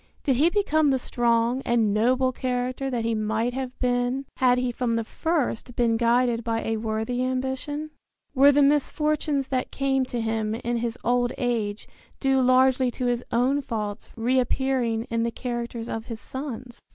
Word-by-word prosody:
Did 270 -5 +2
he 310 +6 +4
become 315 -6 +2
the 265 - +3
strong 240 0 +1
and 225 -4 +2
noble 255 +4 +2
character 255 +1 -2
that 240 -3 -2
he 230 - +1
might 220 +2 -1
have 260 0 -5
been 245 +2 0
had 250 -2 +4
he 250 0 0
from 235 -1 -1
the 230 - 0
first 260 -3 -2
been 235 -2 +2
guided 235 0 +2
by 225 0 -1
a 225 0 -1
worthy 220 +3 -2
ambition? 265 +4 -3 0.4
Were 280 +1 +7
the 285 0 +4
misfortunes 295 0 +1
that 255 -1 -1
came 270 -1 0
to 245 -1 -4
him 220 -1 -1
in 235 +1 -2
his 235 0 -2
old 245 0 +1
age 225 -4 -2 0.3
due 270 -1 +2
largely 255 0 +4
to 250 +1 -4
his 245 0 0
own 260 +4 +2
faults 210 -4 -4
reappearing 250 -1 0
in 230 0 +1
the 235 - +1
characters 235 -1 -4
of 225 -1 -4
his 230 -2 -7
sons? 255 -3 -7
245 Hz, 170 wpm, -25 LUFS, 230-265 Hz, 0.4 s, Were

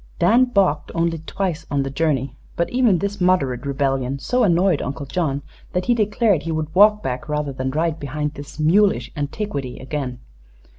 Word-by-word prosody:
Dan 245 - +5
balked 190 -11 +1
only 165 -1 0
twice 165 -1 -3
on 140 -1 0
the 135 - -4
journey, 140 -3 0 0.2
but 170 - 0
even 245 -7 +3
this 200 +2 -3
moderate 140 -9 +1
rebellion 135 -1 0
so 245 - 0
annoyed 180 -3 +3
Uncle 140 +1 -4
John 140 -1 -2 0.3
that 180 0 -1
he 245 - +3
declared 210 -5 +2
he 165 - -4
would 155 -1 -3
walk 210 +3 +5
back 125 +3 -4
rather 150 -2 -1
than 130 0 -3
ride 160 +3 -1
behind 150 +1 -3
this 145 -1 -10
"mulish 195 +7 +3
antiquity" 145 -3 -4
again. 130 -2 -4
155 Hz, 170 wpm, -21 LUFS, 140-190 Hz, 0.3 s, Dan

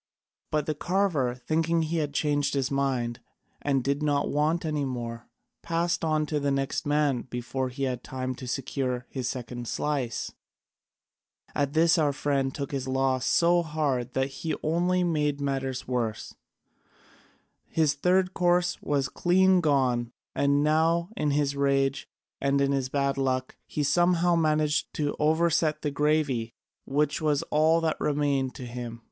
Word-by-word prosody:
But 150 -1 0
the 155 - -1
carver, 160 -7 0
thinking 160 +6 0
he 160 +2 -2
had 150 -2 -1
changed 145 0 0
his 135 -1 0
mind 130 -4 -1 0.4
and 135 -3 +1
did 140 +2 0
not 145 -1 +1
want 155 +4 +1
any 150 -2 -1
more, 120 -3 -5 0.3
passed 170 +1 -1
on 155 -1 +1
to 150 0 -1
the 140 0 0
next 135 +1 -1
man 145 -4 +2
before 125 +2 -3
he 135 +2 -5
had 125 -2 -2
time 130 0 -4
to 130 - -8
secure 125 -1 -2
his 130 -2 -2
second 120 -1 -5
slice. 135 -6 -2 1.2
At 140 0 0
this 165 +1 +4
our 145 -2 +2
friend 140 -1 0
took 140 0 -5
his 135 -2 -3
loss 130 -1 +1
so 175 +1 +4
hard 145 -6 -1
that 135 +1 0
he 155 +4 -3
only 175 +3 +1
made 150 -4 0
matters 135 -2 -2
worse: 120 -4 -2 1.3
his 155 -3 +2
third 180 +5 +2
course 175 0 +1
was 140 -2 0
clean 185 +1 +3
gone, 130 -6 +1 0.2
and 140 +1 +2
now 165 +3 +2
in 150 - 0
his 140 -1 +1
rage 140 -1 +1 0.3
and 140 0 +2
his 135 -2 +1
bad 140 0 0
luck 130 -1 -1
he 150 - -2
somehow 175 +3 +3
managed 155 -2 +1
to 145 -1 -1
overset 155 0 +2
the 150 - 0
gravy, 145 -6 0 0.3
which 145 +2 0
was 150 -2 +1
all 160 +2 +4
that 160 -1 0
remained 140 -3 0
to 130 - -7
him. 120 -1 -6
145 Hz, 150 wpm, -27 LUFS, 130-155 Hz, 1.3 s, this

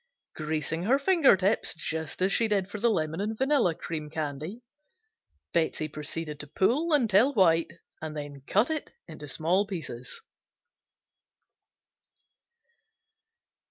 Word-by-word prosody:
Greasing 155 +2 -2
her 260 +6 +4
finger 290 - +5
tips 195 +4 +1
just 160 +1 -2
as 190 - +3
she 230 - +3
did 200 -3 +1
for 205 +1 -7
the 235 +3 +3
lemon 160 -4 -1
and 215 +2 -3
vanilla 265 - +2
cream 160 -3 -5
candy, 155 - -5 0.9
Betsey 160 -2 +1
proceeded 150 0 -4
to 145 - -6
pull 260 - +1
until 250 -1 +4
white 170 -5 +3 0.3
and 155 -1 -5
then 145 -1 -7
cut 215 +9 +2
it 310 -2 -3 0.2
in 160 -3 -10
small 175 +8 +1
pieces. 150 - -7
175 Hz, 125 wpm, -28 LUFS, 155-220 Hz, 0.9 s, finger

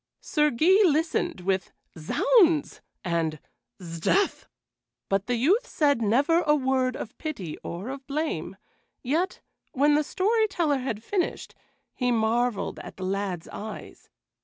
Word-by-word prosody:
Sir 300 -1 +1
Guy 350 - +4
listened 320 - +1
with 190 0 -1 0.2
"Zounds!" 320 - +2 0.2
and 165 -3 -1 0.4
"'Sdeath!" 170 - 0 0.6
but 195 +1 0
the 245 - +1
youth 325 - +2
said 285 -6 +2
never 275 +11 +3
a 300 -2 +3
word 260 -2 +1
of 220 - -7
pity 205 - -5
or 185 +8 -6
of 270 0 -7
blame; 275 - -3 0.5
yet, 320 +9 -1 0.3
when 290 +3 +3
the 300 +1 +3
story 435 +8 +1
teller 320 -8 0
had 230 -4 -4
finished, 370 - -2 0.4
he 250 -1 0
marveled 230 0 0
at - - -10
the 185 - -5
lad's 190 -3 -3
eyes. 215 +1 -9
260 Hz, 135 wpm, -26 LUFS, 200-310 Hz, 0.6 s, Guy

